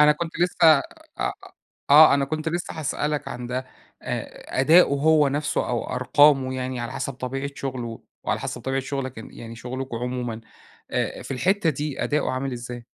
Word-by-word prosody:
أنا 150 0 +7
كنت 165 +2 -5
لسه 170 -3 +5 0.4
أ - - 0 0.6
آه 150 +1 +9
أنا 140 0 +2
كنت 155 +3 -3
لسه 175 +2 -3
هاسألك 150 0 -2
عن 125 0 -6
ده، 125 +1 -2 0.4
أ - - -4
أدائه 160 +7 +7
هو 150 +1 +3
نفسه 145 +2 -1
أو - - -1
أرقامه 135 -3 +4
يعني 130 -1 -3
على 120 - -4
حسب 135 - -3
طبيعة 135 +2 -4
شغله، 125 -4 -5 0.2
وعلى - - -1
حسب - - -4
طبيعة 135 0 -1
شغلك 130 -2 -4
ان 110 - -9
يعني 115 0 -9
شغلكم 130 +1 -5
عمومًا، 120 -1 -3 0.5
آآ - - -2
في - - -11
الحتة 180 +6 +2
دي 145 0 -3
أداؤه 150 -3 0
عامل 130 +1 -2
إزاي؟ 120 0 -7
135 Hz, 170 wpm, -24 LUFS, 125-150 Hz, 0.6 s, آه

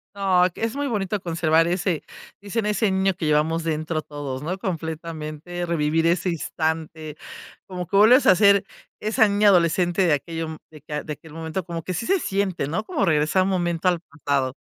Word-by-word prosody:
Ay, 185 -2 +3
que - - -12
es 225 +2 -1
muy 285 0 -1
bonito 205 -3 -1
conservar 165 -1 +2
ese 175 -2 -1 0.4
dicen: 205 +2 -2
"Ese 210 0 +1
niño 190 0 +2
que 175 -2 -5
llevamos 155 +2 +1
dentro 155 0 -2
todos", 145 -3 -6
¿no?, 175 +5 -3
completamente, 165 -1 -5
revivir 165 -1 +1
ese 175 +2 +1
instante, 160 -2 -3 0.5
como 180 -2 -5
que 195 - +1
vuelves 240 +6 +6
a 185 - +7
ser 200 0 +5 0.3
esa 215 +1 +3
niña 205 0 +4
adolescente 175 +1 +3
de 165 - +3
aquello, 165 +2 -3
mm, 160 - -7
de 155 -2 -13
que 150 0 -5
de 150 - -5
aquel 150 +1 -14
momento, 165 +3 -4
como 170 -2 -5
que - - -5
así 180 +6 -3
se 385 0 +2
siente, 190 - -1
¿no?, 175 +9 -2
como 265 - -1
regresar 155 +3 +2
un 195 - 0
momento 175 -1 0
al 175 -2 +2
pasado. 140 -5 -2
170 Hz, 190 wpm, -23 LUFS, 155-195 Hz, 0.5 s, a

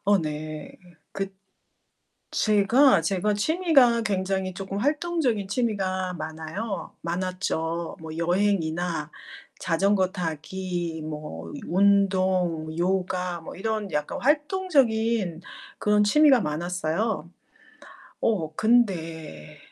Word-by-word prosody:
어 205 0 +4
네. 155 -1 -5 0.4
그 195 0 -4 1.0
제가 225 +6 +4
제가 200 +1 0
취미가 270 - +3
굉장히 190 -2 -1
쪼금 195 +1 -5
활동적인 290 - 0
취미가 190 -5 -1
많아요. 160 +6 -5
많았죠. 170 -1 -2
뭐 160 -1 -8
여행이나 175 -1 0 0.5
자전거 190 +2 +2
타기 175 0 -4
뭐 150 - -7 0.2
운동, 185 -4 +2
요가 180 -1 -1
뭐 160 - -9
이런 215 0 -3
약간 150 -1 -2
활동적인 245 - +1 0.4
그런 210 0 +3
취미가 275 +3 +5
많았어요. 175 +5 -2 0.9
어 165 -9 0
근데 165 - 0
190 Hz, 195 characters per minute, -25 LUFS, 165-215 Hz, 1.0 s, 취미가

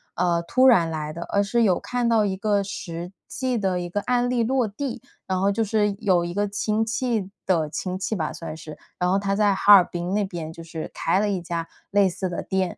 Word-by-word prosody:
呃， 170 -1 +1
突 255 +9 +4
然 175 -10 +5
来 155 -1 -4
的， 170 - -7
而 200 - +2
是 230 +4 +1
有 185 -4 +3
看 245 -1 -1
到 220 -2 +3
一 190 -2 -1
个 205 0 +1
实 175 -3 -6 0.2
际 255 -2 -1
的 190 -3 0
一 175 0 -4
个 205 +3 -2
案 245 +1 +1
例 240 -2 +1
落 250 -1 +1
地。 240 +5 -5 0.2
然 185 -1 -1
后 200 +1 +3
就 225 - -1
是 210 -1 +1
有 185 -5 +2
一 175 - -4
个 205 +2 0
亲 210 +2 0
戚 230 -4 -1 0.2
的 165 -5 +1
亲 185 +3 -4
戚 215 - -2
吧 155 -4 -2
算 165 -2 -7
是， 155 -1 -10 0.2
然 180 0 +1
后 195 - +3
他 195 0 -1
在 205 -1 +3
哈 205 +2 +6
尔 190 - +9
滨 175 +2 -4
那 210 0 +2
边 170 -4 -5
就 165 - -10
是 160 -1 -6
开 180 +4 +1
了 210 0 +1
一 190 -3 -1
家 170 -1 -4 0.2
类 200 -1 +4
似 185 +1 -3
的 175 - -3
店。 190 -2 -1
195 Hz, 260 characters per minute, -24 LUFS, 175-215 Hz, 0.2 s, 尔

